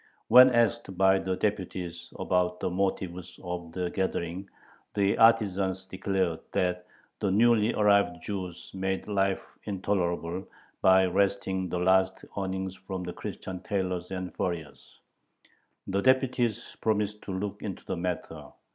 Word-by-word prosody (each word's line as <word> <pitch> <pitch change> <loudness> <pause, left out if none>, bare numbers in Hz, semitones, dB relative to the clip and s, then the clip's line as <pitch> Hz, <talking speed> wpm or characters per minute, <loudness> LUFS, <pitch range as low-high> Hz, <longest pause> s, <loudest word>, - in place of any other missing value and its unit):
When 125 +1 +10
asked 115 -5 +1
by 95 0 +5
the 95 -1 -1
deputies 90 -4 -3
about 90 -1 0
the - - -1
motive 95 -1 0 0.3
of 90 -2 -5
the 90 0 -2
gathering, 95 0 -2 0.5
the 100 -1 +3
artisans 100 -5 +3
declared 95 -3 -1
that 90 0 0 0.3
the 100 - 0
newly 115 +2 +4
arrived 100 -4 +3
Jews 95 -4 -5
made 95 0 -2
life 95 -2 0 0.2
intolerable 90 -3 -1 0.4
by 95 0 +6
wresting 95 0 0
the 90 - -2
last 95 +1 +2
earnings 95 -1 -3
from 95 0 -6
the 90 0 -5
Christian 90 -1 -6
tailors 90 -2 -2
and 95 -1 -5
furriers. 85 -5 -5 0.8
The 100 +1 0
deputies 130 -3 +1
promised 105 -1 0
to - - -5
look 95 +2 -4
into - - -6
the - - -2
matter. 90 0 -4
95 Hz, 130 wpm, -28 LUFS, 90-100 Hz, 0.8 s, When